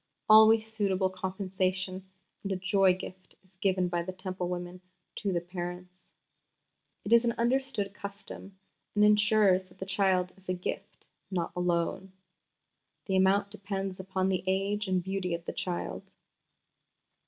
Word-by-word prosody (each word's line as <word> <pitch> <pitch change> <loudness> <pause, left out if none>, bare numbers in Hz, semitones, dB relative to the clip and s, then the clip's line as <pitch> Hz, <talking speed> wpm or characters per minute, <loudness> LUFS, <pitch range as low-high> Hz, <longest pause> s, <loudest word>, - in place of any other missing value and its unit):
Always 220 +1 +7
suitable 200 -4 0
compensation 185 0 -2 0.3
and 200 - -4
a - - +1
'joy 190 0 +3
gift' 185 0 -10
is 185 - -29
given 185 -2 +2
by 175 -1 -1
the 180 +2 -5
Temple 185 -1 -4
women 180 0 -5 0.4
to 200 - -1
the 175 -2 0
parents. 180 +1 -8 0.9
It 210 - +2
is 235 0 +7
an 235 -1 +1
understood 235 -4 0
custom, 200 -1 -9 0.4
and 210 0 +5
ensures 210 -3 +4
that 180 0 -22
the 190 - -5
child 190 -2 +1
is 190 -1 -15
a 185 - +1
gift, 180 - -6 0.2
not 175 -3 -2
a - - -3
loan. 180 +2 -1 0.9
The 190 - -1
amount 195 +2 +3
depends 195 -2 -4
upon 190 0 -1
the 185 -1 0
age 200 +2 0
and 185 -1 +1
beauty 190 -2 -2
of 170 0 -9
the - - -4
child. 180 -2 -4
190 Hz, 150 wpm, -30 LUFS, 185-200 Hz, 0.9 s, Always